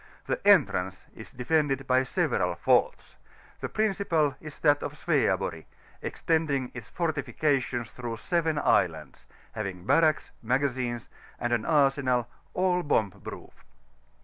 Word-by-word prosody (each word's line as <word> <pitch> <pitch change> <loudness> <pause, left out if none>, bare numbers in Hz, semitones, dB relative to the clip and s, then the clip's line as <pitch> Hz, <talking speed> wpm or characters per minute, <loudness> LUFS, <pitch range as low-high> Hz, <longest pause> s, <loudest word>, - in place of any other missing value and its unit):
The - - -2
entrance 95 +1 +3
is 110 - -11
defended 135 +1 0
by 130 0 +3
several 130 - 0
forts; - - +1 0.4
the - - -4
principal 190 -9 +1
is 150 -1 -9
that 145 -2 +4
of 150 - -5
Sweaborg, 95 - 0 0.4
extending 145 -6 -1
its 125 -3 -9
fortifications 140 -6 -1
through 120 -2 -5
seven 160 +4 0
islands, 80 - 0 0.2
having 95 -4 -5
barracks, 155 +5 +3
magazines, 125 -1 -1 0.3
and 120 0 -1
an 115 -2 0
arsenal,^ 140 +5 +1
bomb 105 -8 +2
proof. - - -11
130 Hz, 115 wpm, -28 LUFS, 120-155 Hz, 0.4 s, that